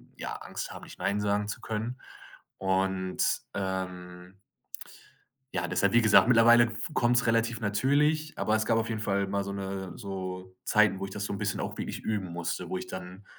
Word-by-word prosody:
ja, -, -, -5 dB
Angst -, -, -6 dB
haben, -, -, -9 dB
nicht -, -, -12 dB
nein 100 Hz, +1 st, 0 dB
sagen 105 Hz, 0 st, 0 dB
zu -, -, -4 dB
können.“ 110 Hz, +3 st, -4 dB, 0.6 s
Und 95 Hz, -1 st, 0 dB, 0.3 s
ähm 90 Hz, -1 st, -5 dB, 1.2 s
ja, 90 Hz, -1 st, -1 dB
deshalb, 95 Hz, +2 st, +2 dB
wie 120 Hz, 0 st, +5 dB
gesagt, 110 Hz, +1 st, +7 dB
mittlerweile 120 Hz, 0 st, +7 dB
f 115 Hz, 0 st, -4 dB
kommt 120 Hz, 0 st, +3 dB
es 120 Hz, -1 st, +2 dB
relativ 115 Hz, +1 st, +1 dB
natürlich, 145 Hz, +9 st, +1 dB
aber 110 Hz, 0 st, +1 dB
es 110 Hz, -, -1 dB
gab 115 Hz, -, +3 dB
auf 115 Hz, 0 st, 0 dB
jeden 110 Hz, -2 st, -2 dB
Fall 100 Hz, -2 st, 0 dB
mal 100 Hz, 0 st, -1 dB
so 100 Hz, -, -4 dB
'ne 95 Hz, -1 st, -4 dB
so 95 Hz, -2 st, -6 dB
Zeiten, 105 Hz, -3 st, +4 dB
wo 95 Hz, -, -4 dB
ich 95 Hz, -, -6 dB
das 100 Hz, 0 st, -4 dB
so -, -, -4 dB
'n 100 Hz, -, -3 dB
bisschen 105 Hz, -2 st, -1 dB
auch -, -, -4 dB
wirklich -, -, -4 dB
üben 100 Hz, -5 st, -2 dB
musste, 85 Hz, +1 st, -3 dB
wo -, -, -2 dB
ich -, -, -6 dB
dann 95 Hz, +2 st, -8 dB
100 Hz, 195 wpm, -29 LUFS, 95-110 Hz, 1.2 s, gesagt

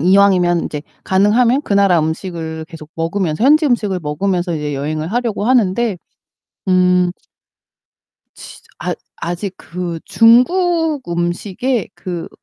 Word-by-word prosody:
이왕이면 180 Hz, -1 st, +4 dB
이제 150 Hz, -1 st, -5 dB, 0.2 s
가능하면 230 Hz, +8 st, +3 dB
그 215 Hz, -, -4 dB
나라 200 Hz, -3 st, +4 dB
음식을 160 Hz, 0 st, -4 dB
계속 160 Hz, -3 st, -11 dB
먹으면서 165 Hz, +2 st, -2 dB
현지 305 Hz, +3 st, +5 dB
음식을 210 Hz, -8 st, 0 dB
먹으면서 175 Hz, +3 st, -1 dB
이제 150 Hz, -2 st, -3 dB
여행을 155 Hz, +4 st, -3 dB
하려고 235 Hz, -3 st, -1 dB
하는데 230 Hz, -3 st, +2 dB, 0.7 s
음 180 Hz, -1 st, +3 dB, 1.2 s
진짜 -, -, -12 dB, 0.2 s
아 -, -, -2 dB, 0.2 s
아직 175 Hz, +3 st, -4 dB
그 170 Hz, +1 st, -5 dB
중국음식의 245 Hz, -, +1 dB
그 175 Hz, -2 st, -6 dB
185 Hz, 265 characters per minute, -17 LUFS, 165-230 Hz, 1.2 s, 현지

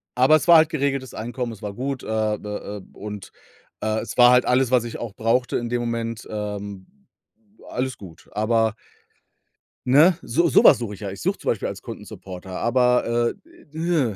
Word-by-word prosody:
Aber 130 Hz, +5 st, +5 dB
es 155 Hz, -, 0 dB
war 170 Hz, -1 st, +9 dB
halt 160 Hz, 0 st, +5 dB
geregeltes 140 Hz, -4 st, -2 dB
Einkommen, 120 Hz, +2 st, -4 dB
es 110 Hz, -, -11 dB
war 105 Hz, -1 st, -5 dB
gut, 130 Hz, +4 st, -4 dB
äh, 110 Hz, -1 st, -1 dB
d -, -, -10 dB
äh, 105 Hz, 0 st, -6 dB
und, 105 Hz, -2 st, -8 dB, 0.5 s
äh, 110 Hz, 0 st, 0 dB
es -, -, -7 dB
war 120 Hz, 0 st, +8 dB
halt 125 Hz, 0 st, +5 dB
alles, 125 Hz, 0 st, +2 dB
was 125 Hz, -2 st, +4 dB
ich 120 Hz, -, -6 dB
auch 115 Hz, -4 st, -6 dB
brauchte 115 Hz, +3 st, +1 dB
in 120 Hz, -1 st, -4 dB
dem 120 Hz, 0 st, -1 dB
Moment 115 Hz, -1 st, -4 dB
ähm, 100 Hz, -2 st, -5 dB, 0.8 s
alles 130 Hz, 0 st, -3 dB
gut. 90 Hz, -5 st, -14 dB
Aber 110 Hz, +1 st, +1 dB, 1.1 s
ne? 150 Hz, +8 st, +6 dB
So 170 Hz, +8 st, +2 dB
so -, -, +5 dB
was -, -, +8 dB
suche 115 Hz, -4 st, -5 dB
ich 100 Hz, -, -11 dB
ja. 100 Hz, -, -5 dB
Ich 95 Hz, -, -9 dB
suche -, -, 0 dB
zum -, -, -3 dB
Beispiel -, -, -1 dB
als -, -, -6 dB
Kundensupporter, 95 Hz, 0 st, -9 dB
aber, 120 Hz, -1 st, +2 dB, 0.4 s
äh,, 160 Hz, -, 0 dB
115 Hz, 185 wpm, -23 LUFS, 105-130 Hz, 1.1 s, war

